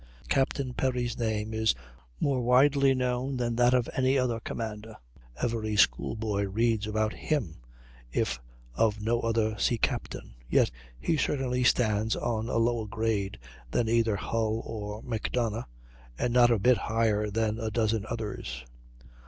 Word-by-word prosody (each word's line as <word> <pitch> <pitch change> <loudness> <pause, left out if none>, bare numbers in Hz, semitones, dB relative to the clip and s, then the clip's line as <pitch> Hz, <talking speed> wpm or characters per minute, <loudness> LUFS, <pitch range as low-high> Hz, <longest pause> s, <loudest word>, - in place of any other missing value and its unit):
Captain 135 -1 0
Perry's 125 -2 -1
name 110 -2 -2
is 110 - +2 0.4
more 135 -3 +1
widely 135 +2 +4
known 125 +1 -1
than 120 -1 -1
that 120 +1 +4
of 125 -2 +2
any 130 +1 +3
other 125 -3 0
commander. 110 -1 -6 0.4
Every 110 -3 -1
school 60 - +3
boy 105 -2 -1
reads 110 +1 +1
about 110 0 0
him, 125 - -2 0.5
if - - -1 0.3
of 110 - +1
no 115 +2 +1
other 110 -1 0
sea 120 - +2
captain; - - -3 0.2
yet - - +3 0.3
he 160 - 0
certainly 130 -3 0
stands 110 -3 +2
on 115 -1 -2
a - - 0
lower 115 -1 +1
grade 105 -2 -1 0.3
than 115 - 0
either 115 -2 +2
Hull 110 +2 -1
or 105 -1 -6
Macdonough, 115 -1 -2 0.5
and 120 - 0
not 120 -1 +6
a 115 - +4
bit 120 +4 +4
higher 110 -2 +1
than 110 +1 0
a 110 - -2
dozen 110 -1 0
others. 105 - -5
115 Hz, 145 wpm, -28 LUFS, 110-125 Hz, 0.5 s, not